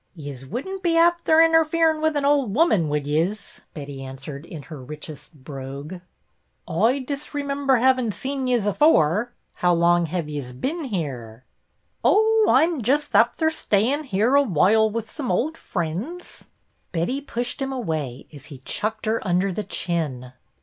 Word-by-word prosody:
"Yez 140 -5 -8
wouldn't 380 - -5
be 335 -2 +2
afther 335 -1 +5
interferin' 325 -1 +3
wit' 315 -1 +1
an' 285 -1 0
ould 280 -7 +2
woman, 215 - +3
would 145 -1 -1
yez 165 +8 -2
.i* - - -34
" - - -47
Betty 140 -3 -7
answered 135 +3 -8
in 160 -4 -8
her 140 0 -9
richest 150 +1 -9
brogue. 140 +5 -7 0.4
" - - -47 0.2
Oi 225 - +2
disremimber 280 -1 -1
havin' 255 -2 +3
seen 265 +4 -3
yez 240 -5 +1
afore. 210 - +3 0.2
How 175 -1 +2
long 170 0 +3
hev 170 -1 -3
yez 145 -4 -5
bin 295 - -3
here? 130 - -5 0.2
" - - -47
" - - -46
Oh, 440 +1 +4
I 265 - +6
'm 325 -4 0
just 280 +7 0
afther 320 -1 +3
stayin' 270 +2 0
here 220 +2 +1
a 285 - +7
whoile 220 - +3
wit' 230 0 -3
some 275 +1 -6
ould 255 - 0
frinds." 200 - -4
i68 - - -14
BETTY - - -21
BAIRD - - -44
Betty 185 +12 -1
pushed 245 -2 -4
him 270 0 -2
away 155 - -4
as 145 -2 -12
he 145 -4 -10
chucked 215 +1 -2
her 220 +1 0
under 185 +1 +1
the 210 - -3
chin. 140 -11 -3
210 Hz, 175 wpm, -23 LUFS, -, 0.4 s, a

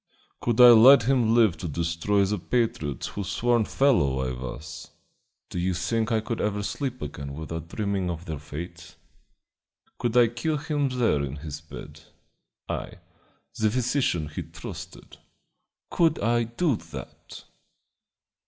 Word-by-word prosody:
"Could 120 -1 0
I 125 -1 +11
let 120 +3 +8
him 120 -2 +2
live 110 -8 +4
to 85 - -5
destroy 85 +6 0
the 105 +1 -1
patriots 85 - -1
whose 100 -2 -5
sworn 120 -1 +2
fellow 85 - +2
I - - -2
was? 65 +4 -8 0.6
Do 90 - -3
you 90 +1 0
think 110 +7 -1
I 110 -1 +2
could 115 +1 -3
ever 105 -1 -1
sleep 125 +2 -4
again 70 -1 -6
without 80 +1 -6
dreaming 100 -1 -2
of 85 0 -5
their 80 -5 -5
fate? 85 +4 -9 1.0
Could 120 0 0
I 120 -2 +6
kill 150 +7 -2
him 145 -2 -1
there 115 - +1
in 70 0 -4
his 75 0 -7
bed 80 - -11 0.7
I, - - -4 0.7
the 110 0 +3
physician 125 - 0
he 75 - -5
trusted? - - -10 0.7
Could 165 -2 +3
I 120 +2 +1
do 120 +3 0
that?" - - -11
105 Hz, 145 wpm, -26 LUFS, 80-120 Hz, 1.0 s, I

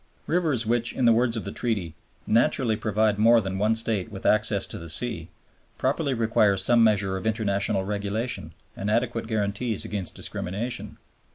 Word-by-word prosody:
Rivers 155 -9 +1
which, 120 +1 0
in 130 - 0
the 115 - +6
words 115 0 +2
of 110 - -4
the - - -5
Treaty, 100 -9 -2 0.3
"naturally 115 0 +2
provide 105 0 0
more 115 +2 +6
than 95 -2 -3
one 110 +2 +2
State 110 -3 -1
with 95 - -9
access 110 -2 +2
to - - -7
the 85 0 -8
sea," 85 -2 -2 0.5
properly 140 +1 0
require 110 -3 +2
some 120 +4 +3
measure 100 -3 +2
of 105 - -4
international 100 -3 0
regulation 105 +4 -2 0.2
and 100 - -3
adequate 115 0 0
guarantees 110 0 -2
against 95 -6 -3
discrimination. 105 +7 -4
110 Hz, 165 wpm, -25 LUFS, 100-115 Hz, 0.5 s, the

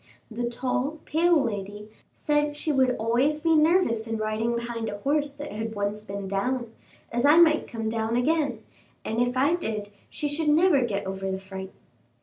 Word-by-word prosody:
The 240 +2 -2
tall, 255 +5 -2
pale 335 +2 +3
lady 205 -1 -5 0.2
said 295 0 0
she 305 +1 -2
should 260 -3 +3
always 250 +7 +1
be 325 +1 +3
nervous 305 -8 +3
in 225 0 -2
riding 215 +2 -1
behind 235 -1 -3
a 205 - -5
horse 290 +5 0
that 290 +1 -8
had 220 +1 -4
once 205 +1 -2
been 200 -2 -6
down, 230 +4 -2 0.4
as 240 +1 -1
I 295 +3 +6
might 320 -2 +5
come 225 -2 -4
down 220 +1 -1
again, 270 -3 0 0.4
and 225 +2 -1
if 245 +1 0
I 280 +5 +3
did 215 -11 -3 0.2
she 295 - -3
should 300 +2 -1
never 310 -1 +4
get 205 -5 -2
over 190 0 -4
the 190 - -2
fright." 190 0 -8
240 Hz, 180 wpm, -26 LUFS, 215-295 Hz, 0.4 s, I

